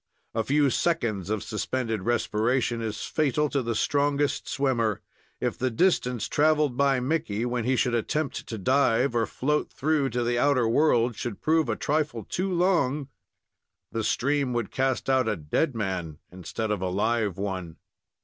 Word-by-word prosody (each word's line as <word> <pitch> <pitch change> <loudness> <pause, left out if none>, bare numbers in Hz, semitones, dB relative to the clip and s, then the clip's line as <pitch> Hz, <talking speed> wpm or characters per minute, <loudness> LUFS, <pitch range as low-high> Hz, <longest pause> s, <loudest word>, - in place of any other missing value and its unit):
A 115 - 0
few 140 +3 +2
seconds 110 - 0
of 110 -2 -1
suspended 110 0 -2
respiration 120 +2 0
is 110 -2 -4
fatal 150 -1 0
to 140 - 0
the 115 -2 -2
strongest 145 +3 +1
swimmer. 120 -7 0 0.4
If - - -2
the 130 - +1
distance 125 - +1
traveled 150 0 +2
by 140 -1 +3
Mickey, 125 -5 -1
when 120 -2 -2
he 130 +1 +2
should 125 -1 +1
attempt 140 +5 -2
to 115 - -5
dive 130 +2 +2
or 115 -2 +1
float 150 +3 -1
through 150 -1 +1
to 120 -1 -1
the 120 0 0
outer 130 -4 +3
world, 120 -2 +3
should 120 -2 -5
prove 160 0 +2
a - - +1
trifle 150 -6 -1
too 185 - -2
long, 170 -6 +1 0.8
the 115 - -2
stream 140 +2 0
would 120 -3 -2
cast 130 0 0
out 130 -3 +3
a 105 - 0
dead 95 - -1
man 95 -8 -3
instead 95 +5 -4
of 105 -3 -1
a 95 - -1
live 105 0 0
one. 95 -4 -4
125 Hz, 165 wpm, -26 LUFS, 110-145 Hz, 0.8 s, by